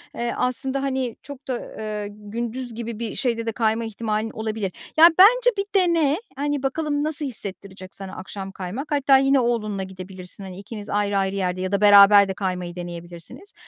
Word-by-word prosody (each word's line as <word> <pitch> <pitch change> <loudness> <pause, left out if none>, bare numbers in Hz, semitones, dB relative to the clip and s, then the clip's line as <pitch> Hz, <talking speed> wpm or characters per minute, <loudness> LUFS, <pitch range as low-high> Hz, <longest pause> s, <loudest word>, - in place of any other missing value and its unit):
eee, 235 0 -2
aslında, 265 +2 0
hani, 260 -3 -2
çok 285 0 -11
da, 250 -2 -2 0.2
eee, 210 -1 -4
gündüz 230 +4 -6
gibi 230 -1 -5
bir 230 -2 -4
şeyde 230 -3 -1
de 225 - -1
kayma 225 0 0
ihtimalin 220 0 -2
olabilir. 220 -3 -3 0.3
Yani, 330 +1 +8
bence - - +7
bir 395 - 0
dene, 335 -6 +3 0.2
hani, 290 0 -2
bakalım 290 +1 -1
nasıl 305 -1 -1
hissettirecek 195 -5 -5
sana 195 -1 -8
akşam 195 +1 -7
kaymak. 195 - -6
Hatta 280 -2 +5
yine 270 0 +3
oğlunla 215 -5 -1
gidebilirsin, 185 0 -9
hani, 185 -1 -8
ikiniz 205 +1 -8
ayrı 205 -1 0
ayrı 195 0 0
yerde 185 -1 -1
ya 185 - -2
da 200 0 0
beraber 200 0 +8
de 190 - -2
kaymayı 180 -2 -3
deneyebilirsiniz. 175 - -8
220 Hz, 175 wpm, -23 LUFS, 195-270 Hz, 0.3 s, Yani